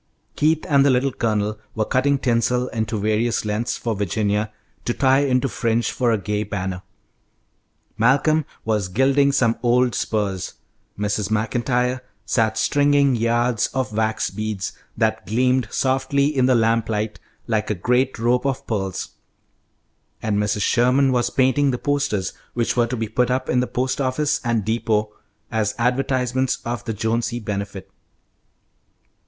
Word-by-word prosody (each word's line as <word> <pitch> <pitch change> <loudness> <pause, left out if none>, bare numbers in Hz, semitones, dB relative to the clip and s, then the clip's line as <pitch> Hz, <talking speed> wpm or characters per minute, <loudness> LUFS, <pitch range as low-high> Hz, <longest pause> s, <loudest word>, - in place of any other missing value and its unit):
Keith 155 +1 +2
and 140 -2 +4
the 140 - +4
Little 130 +1 +2
Colonel 105 -3 -1 0.2
were 110 - 0
cutting 140 +3 +2
tinsel 125 0 +1
into 110 -1 -2
various 110 +2 0
lengths 105 +3 -1
for 115 - -2
Virginia 105 +2 -1 0.3
to 120 - -1
tie 135 0 +4
into 135 -1 +2
fringe 115 -2 0
for 120 -2 +1
a 110 - +2
gay 105 +1 -2
banner. 95 -3 -4 1.2
Malcolm 145 +6 +3 0.2
was 105 -4 0
gilding 135 +7 +3
some 115 -5 +1
old 125 0 +3
spurs, 100 -4 -2 0.4
Mrs. 105 0 -1
Maclntyre 120 +3 0 0.2
sat 110 +1 +1
stringing 145 -2 +3
yards 115 0 +1
of 130 -4 -1
wax 110 0 0
beads, 105 -1 -4 0.2
that - - 0
gleamed 125 +3 +2
softly 140 +2 +1
in 130 -1 +3
the 130 - +4
lamplight 110 -2 0 0.3
like 105 -5 -2
great 125 +1 +2
rope 120 +3 +1
of 135 0 -2
pearls, 95 -4 -3 1.1
and 105 -2 -1
Mrs. 105 -1 0
Sherman 130 +2 +3
was 125 -1 +1
painting 135 +2 +2
the 125 - 0
posters, 140 - -1 0.2
which 120 -1 0
were 120 -1 +3
to 125 - -3
be 115 0 -2
put 120 +3 +1
up 130 +1 -1
in 125 - +2
the 125 - 0
post 130 +2 -1
office 135 +3 0
and 115 -5 0
depot 110 -1 0 0.4
as 105 -2 0
advertisements 125 +1 0
of 120 -2 -3
the 115 - -2
Jonesy 115 +2 -1
Benefit. 100 -3 -5
120 Hz, 145 wpm, -22 LUFS, 110-130 Hz, 1.2 s, and